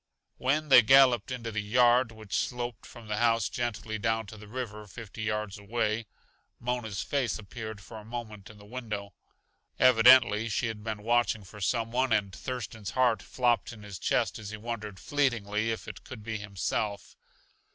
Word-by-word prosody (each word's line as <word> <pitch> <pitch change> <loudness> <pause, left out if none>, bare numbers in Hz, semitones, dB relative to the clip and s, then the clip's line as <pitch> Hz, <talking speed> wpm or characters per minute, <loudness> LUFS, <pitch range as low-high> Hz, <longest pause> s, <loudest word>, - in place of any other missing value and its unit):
When 150 +4 +1
they 125 - +10
galloped 125 -2 +6
into 120 -3 -4
the 110 0 -1
yard 120 +2 +4
which 110 -2 -11
sloped 120 +1 -3
from 115 -2 -12
the 105 0 -2
house 115 0 +2
gently 110 -2 -3
down 110 +1 0
to 100 - -10
the 105 0 -12
river 105 -3 -6
fifty 110 +1 -9
yards 105 -2 -2
away, 110 +1 -1 0.5
Mona's 115 -5 -2
face 140 -4 0
appeared 110 0 -7
for 100 +3 -11
a - - -12
moment 110 -3 -7
in 105 - -13
the 105 - -15
window. 105 -4 -5 0.6
Evidently 115 -3 +6
she 120 - 0
had 110 -2 -4
been 105 -2 -4
watching 120 -2 +2
for 105 +2 -12
some 115 +3 0
one, 130 +1 +1
and 100 -3 +1
Thurston's 115 -4 -5
heart 125 -3 +3
flopped 120 -2 +1
in 110 -3 -11
his 100 -3 -8
chest - - 0
as 105 -2 -7
he 110 - -6
wondered, 105 -3 -6
fleetingly, 115 - 0
if 115 - -3
it - - -8
could 120 -5 -9
be 115 0 -3
himself. 100 +1 -3
110 Hz, 175 wpm, -29 LUFS, 105-120 Hz, 0.6 s, they